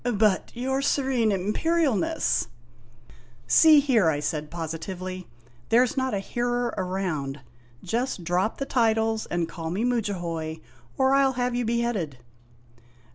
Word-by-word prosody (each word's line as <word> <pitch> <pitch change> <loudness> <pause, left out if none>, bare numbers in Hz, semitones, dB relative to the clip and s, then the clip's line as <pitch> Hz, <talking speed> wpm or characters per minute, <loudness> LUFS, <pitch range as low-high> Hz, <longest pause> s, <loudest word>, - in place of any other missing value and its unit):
"But, 205 -2 +2
your 265 +3 -1
Serene 265 -5 +1
Imperialness 310 - +1 0.5
" 120 0 -24 0.3
"See 305 - +7
here!' 240 - +3
I 145 -2 0
said 150 0 -3
positively; 175 +3 -5 0.4
"there 240 +3 +5
's 245 - -5
not 260 -4 0
a - - 0
hearer 240 +3 -1
around. 180 -7 -3 0.4
Just 230 0 -2
drop 180 +6 0
the 275 - -3
titles 225 -3 +1
and 175 -1 -1
call 165 -2 -6
me 190 +7 -2
Mudjahoy 175 -9 -2 0.4
or 265 0 +3
I 275 - +5
'11 265 -1 +2
have 245 0 0
you 245 0 -1
beheaded!" 225 - -1
215 Hz, 135 wpm, -25 LUFS, 175-245 Hz, 0.5 s, See